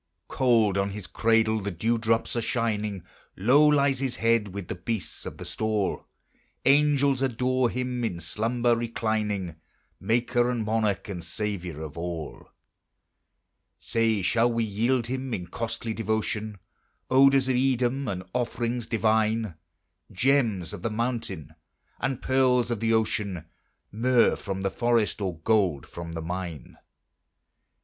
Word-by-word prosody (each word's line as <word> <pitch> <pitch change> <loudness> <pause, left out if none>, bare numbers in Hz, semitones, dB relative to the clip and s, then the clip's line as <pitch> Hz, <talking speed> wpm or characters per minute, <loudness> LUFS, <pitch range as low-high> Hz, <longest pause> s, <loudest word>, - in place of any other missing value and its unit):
Cold 115 -7 +3
on 100 0 0
his 100 -1 -7
cradle 110 +1 +2
the 100 - -3
dew 110 +6 0
drops 115 +1 0
are 120 - 0
shining, 105 -5 -1 0.3
Low 130 +10 +5
lies 140 -3 +3
his 130 -2 -1
head 115 -2 +2
with 100 -2 -7
the - - -3
beasts 90 +2 -4
of - - -7
the - - -8
stall; 110 -3 -2 0.6
Angels 140 -1 +4
adore 130 -1 +1
him 125 0 -3
in 95 -7 -2
slumber 115 +8 +1
reclining, 110 -6 -2 0.4
Maker 120 +3 +1
and 120 -3 -1
Monarch 105 -3 0
and 90 -4 -6
Saviour 90 -7 -4
of 75 +1 -7
all. 85 -3 -6 1.3
Say, 115 -3 0
shall 115 +6 +3
we 115 0 0
yield 115 +4 0
him, 130 0 -3
in 90 - -5
costly 115 +2 -4
devotion, 110 -1 -2 0.5
Odors 135 0 +5
of 130 - +2
Edom, 130 +1 +1
and 95 -4 -3
offerings 120 -1 -2
divine? 110 -2 +1 0.6
Gems 110 -5 +1
of - - -7
the 115 - -1
mountain, 110 - -3 0.5
and 130 0 -2
pearls 125 -2 +3
of 115 - -1
the 115 +1 +1
ocean, 105 -6 0 0.5
Myrrh 120 +2 +3
from 95 -2 -5
the 95 0 -1
forest, 115 -4 +1
or 95 -4 -2
gold 95 - +2
from 85 -1 -8
the 80 -1 -4
mine? 85 -4 -6
115 Hz, 140 wpm, -26 LUFS, 100-120 Hz, 1.3 s, Low